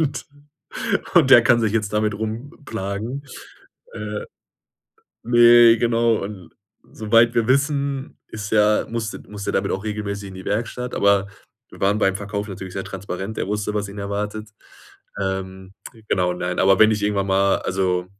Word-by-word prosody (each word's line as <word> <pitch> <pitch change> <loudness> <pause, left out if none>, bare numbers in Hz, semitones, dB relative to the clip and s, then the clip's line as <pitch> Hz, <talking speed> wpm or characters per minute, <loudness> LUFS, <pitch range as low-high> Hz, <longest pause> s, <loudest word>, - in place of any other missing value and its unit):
und 145 -3 -2 0.9
und 130 - +5
der 120 -3 +9
kann 120 0 +4
sich 110 -2 0
jetzt 110 -2 -1
damit 105 -1 0
rumplagen. 110 +1 -5 0.7
Äh, 480 - -5 1.0
ne, 120 -1 +6
genau, 115 0 +2
und 100 -3 -9 0.4
soweit 115 +2 +3
wir 115 -2 +1
wissen, 140 0 0
ist 105 -2 -7
er 105 0 +3
musste 115 -2 -4
musste 105 -1 -5
der - - +2
damit 95 - -2
auch 95 - -11
regelmäßig 100 -2 -4
in 95 - -11
die 95 - -9
Werkstatt, 120 +4 -3
aber 100 -1 +2 0.4
wir - - -14
waren 100 +2 +2
beim 95 -2 +2
Verkauf 105 +1 -5
natürlich 95 -1 -8
sehr 95 - -4
transparent, 95 +2 -6
er - - -2
wusste, 105 +1 -2
was 105 -1 -2
ihn 100 +1 -9
erwartet. 105 +2 -4 0.7
Ähm, 95 -1 -4 0.4
genau, 90 -1 +1
nein, 90 0 -4
aber 95 0 +4
wenn 110 0 +6
ich 105 -1 -1
irgendwann 100 -1 0
mal 95 0 +3
also, 90 -1 -1
105 Hz, 160 wpm, -21 LUFS, 100-115 Hz, 1.0 s, der